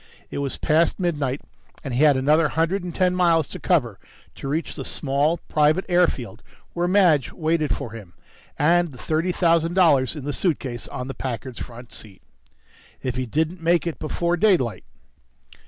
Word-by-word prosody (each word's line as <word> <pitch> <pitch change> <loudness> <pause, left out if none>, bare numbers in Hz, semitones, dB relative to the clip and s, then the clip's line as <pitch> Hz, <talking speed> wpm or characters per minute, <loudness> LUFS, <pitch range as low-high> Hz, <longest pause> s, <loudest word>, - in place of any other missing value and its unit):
It - - -4
was 140 -1 -2
past 160 +5 +2
midnight, 145 -7 -1 0.4
and 135 - -4
he 125 - +1
had 150 -3 +5
another 150 +4 +3
hundred 165 +5 0
and 175 -1 -6
ten 185 -1 +2
miles 170 -4 +3
to - - -7
cover 120 - +1 0.3
to - - -8
reach 155 +4 -2
the - - -5
small 145 +3 0
private 155 +4 +2
airfield 175 - 0 0.3
where 175 0 0
Madge 180 -8 +3
waited 160 -2 0
for 115 - -6
him 105 -6 -11 0.4
and 170 +1 +2
the - - -12
thirty 160 +6 -1
thousand 170 -1 +2
dollars 155 -8 +4
in 150 - -7
the 145 +1 -3
suitcase 130 - -2
on 125 0 -6
the 135 - -5
Packard's 125 -1 -5
front 120 0 -9
seat. 100 -4 -12 0.8
If 125 -2 -2
he 130 -1 -2
didn't 160 +7 -1
make 170 +1 +2
it 170 - -4
before 170 +3 -1
daylight.... 170 - +2
155 Hz, 170 wpm, -23 LUFS, 130-170 Hz, 0.8 s, had